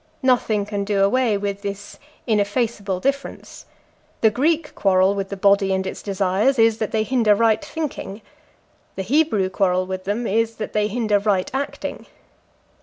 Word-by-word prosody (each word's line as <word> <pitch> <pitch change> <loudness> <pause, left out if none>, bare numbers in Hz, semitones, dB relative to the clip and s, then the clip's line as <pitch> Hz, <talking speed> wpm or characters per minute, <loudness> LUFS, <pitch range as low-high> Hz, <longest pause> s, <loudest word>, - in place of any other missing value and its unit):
Nothing 230 -5 +2
can 205 -1 -3
do 200 -1 +1
away 225 +1 +2
with 200 0 -4
this 200 -1 -7 0.3
ineffaceable 205 -3 0
difference; 275 +5 -4 0.5
the 220 - +5
Greek 300 +6 0
quarrel 190 0 +3
with 195 -1 -4
the 200 - -5
body 200 0 +3
and 190 0 -2
its 190 - -5
desires 200 +6 +1
is, 225 -1 +3
that 220 - -1
they 220 -1 +1
hinder 225 -3 +3
right 225 +3 +2
thinking, 285 -10 -6 0.7
the 190 - -3
Hebrew 250 -5 +2
quarrel 185 -1 +1
with 185 0 -6
them 210 +5 -2
is, 225 +2 0
that 215 - -6
they 210 0 +1
hinder 215 -2 +1
right 200 -3 0
acting. 275 +1 -4
210 Hz, 160 wpm, -21 LUFS, 195-230 Hz, 0.7 s, the